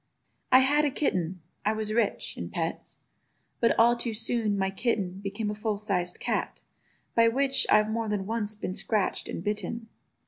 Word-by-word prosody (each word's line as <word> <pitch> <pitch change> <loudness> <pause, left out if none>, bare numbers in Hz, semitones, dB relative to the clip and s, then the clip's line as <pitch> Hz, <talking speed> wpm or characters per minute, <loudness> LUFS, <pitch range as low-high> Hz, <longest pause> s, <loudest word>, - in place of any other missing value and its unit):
I 255 +1 +8
had 290 +3 +4
a 295 - +3
kitten—I 185 - -2
was 215 0 -2
rich 225 -2 0
In - - -5
pets—but 230 - -4
all 235 +1 +6
too 235 -2 -3
soon 225 -2 0
my 190 0 0
kitten 195 -3 -1
Became 205 +2 -3
a - - -3
full 210 0 -2
sized 195 -4 -1
cat, - - -2 0.5
by 230 0 +5
which 270 +3 +2
I've 215 0 +4
more 225 -1 -1
than 205 -2 -1
once 215 0 -2
been 205 -3 -4
scratch'd 205 0 0
and 170 - -5
bitten. 210 +2 -3
215 Hz, 165 wpm, -28 LUFS, 200-230 Hz, 0.5 s, I